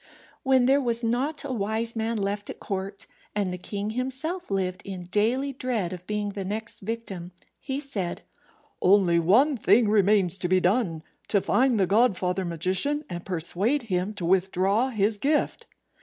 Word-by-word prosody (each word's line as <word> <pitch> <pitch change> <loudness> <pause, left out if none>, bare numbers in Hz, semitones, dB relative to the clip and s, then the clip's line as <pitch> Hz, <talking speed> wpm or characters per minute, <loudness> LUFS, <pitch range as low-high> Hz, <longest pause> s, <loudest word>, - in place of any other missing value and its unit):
When 260 -2 +3
there 275 +2 +4
was 235 -2 0
not 260 +6 -1
a 275 -2 -3
wise 225 +1 -2
man 225 +1 -1
left 205 0 -3
at - - -7
court, 195 0 -5 0.3
and 200 -3 -1
the 180 - -6
king 205 +3 -4
himself 265 +9 -1
lived 190 -1 -1
in 190 -3 -6
daily 235 +9 0
dread 235 -9 -2
of 180 0 -9
being 210 -1 -2
the 200 -1 -5
next 215 +4 -5
victim, 195 -5 -5 0.3
he 270 0 -3
said, 205 -12 -3 0.6
"Only 185 -3 +4
one 240 - +4
thing 230 0 +4
remains 200 -3 +3
to 180 - 0
be 185 +1 +3
done: 180 -4 0 0.2
to 205 - +3
find 250 +3 +2
the 190 - +4
godfather 190 -3 +2
magician, 185 - 0
and 175 0 -5
persuade 190 - -1
him 195 -1 -2
to 185 -4 -4
withdraw 190 +6 +2
his 210 -2 0
gift." 295 +5 0
205 Hz, 165 wpm, -26 LUFS, 185-245 Hz, 0.6 s, there